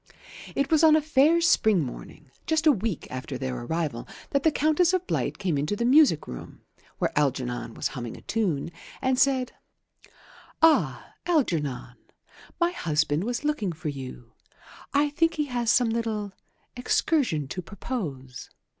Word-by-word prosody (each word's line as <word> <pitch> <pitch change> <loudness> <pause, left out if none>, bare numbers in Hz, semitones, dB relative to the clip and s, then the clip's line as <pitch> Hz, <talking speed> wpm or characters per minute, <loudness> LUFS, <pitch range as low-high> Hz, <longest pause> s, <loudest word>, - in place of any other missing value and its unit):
It 275 +1 0
was 315 0 +4
on 315 -1 +7
a - - +5
fair 305 +2 +3
spring 220 - +4
morning, 125 - -9 0.2
just 320 0 +1
a 310 - +8
week 215 - -2
after 130 +1 -5
their 130 -1 -3
arrival, 135 -1 -3 0.2
that 280 - +2
the 320 - +3
Countess 315 +4 +2
of 370 -1 0
Blight - - -2
came 175 -8 -1
into 150 +8 -1
the 235 - -1
music 260 - +5
room - - -9 0.4
(where - - -1
Algernon 125 -5 -1
was - - -2
humming 120 -3 -6
a - - -13
tune) 175 -9 -1 0.3
and 260 -1 +1
said, 260 -2 +2 1.1
"Ah, 325 -1 +3
Algernon, 150 - -1 0.6
my 345 0 +2
husband 155 - 0
was 245 +3 -2
looking 295 -11 -1
for 160 -1 -5
you. 130 -4 -8 0.6
I 290 +1 +2
think 330 +2 +1
he 300 -2 0
has 240 -4 -2
some 245 -1 +4
little 220 -3 -2 0.4
excursion 245 - +1
to 180 - -4
propose. 160 - -6
220 Hz, 155 wpm, -26 LUFS, -, 1.1 s, a